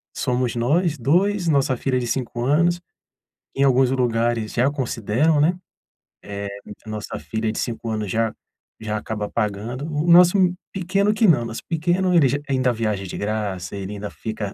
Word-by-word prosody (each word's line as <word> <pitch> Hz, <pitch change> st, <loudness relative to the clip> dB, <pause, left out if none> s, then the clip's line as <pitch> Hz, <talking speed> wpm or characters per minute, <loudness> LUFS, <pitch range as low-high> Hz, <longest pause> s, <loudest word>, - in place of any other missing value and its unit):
somos 125 Hz, -1 st, -1 dB
nós 150 Hz, +7 st, +1 dB
2, 175 Hz, -, +2 dB
nossa 135 Hz, -4 st, +2 dB
filha 130 Hz, +1 st, 0 dB
de 120 Hz, -, -3 dB
5 120 Hz, -1 st, -2 dB
anos, 170 Hz, +5 st, +2 dB, 0.7 s
em 135 Hz, -, +2 dB
alguns 130 Hz, -1 st, +4 dB
lugares 120 Hz, -3 st, 0 dB
já 125 Hz, +3 st, +3 dB
consideram, 135 Hz, +3 st, +1 dB
né. 175 Hz, +4 st, +2 dB, 1.0 s
Eh, 100 Hz, -, -11 dB, 0.2 s
nossa 105 Hz, -1 st, -5 dB
filha 110 Hz, 0 st, -3 dB
de -, -, -5 dB
5 115 Hz, -1 st, -3 dB
anos 110 Hz, -2 st, -2 dB
já 115 Hz, +1 st, 0 dB, 0.5 s
já 110 Hz, -1 st, -3 dB
acaba 105 Hz, 0 st, -4 dB
pagando, 115 Hz, +6 st, -3 dB
o 150 Hz, +2 st, -1 dB
nosso 175 Hz, +3 st, +7 dB, 0.4 s
pequeno 195 Hz, +3 st, +1 dB
que 220 Hz, +1 st, +3 dB
não, 145 Hz, -8 st, +4 dB
nosso 115 Hz, -, -6 dB
pequeno 175 Hz, +3 st, +1 dB
ele 150 Hz, -6 st, +5 dB, 0.2 s
ainda 130 Hz, -2 st, +2 dB
viaja 105 Hz, -3 st, -2 dB
de -, -, -6 dB
graça, 100 Hz, -4 st, -3 dB
ele 100 Hz, +1 st, -5 dB
ainda 100 Hz, 0 st, -6 dB
fica 110 Hz, -2 st, -5 dB
125 Hz, 160 wpm, -22 LUFS, 110-160 Hz, 1.0 s, nosso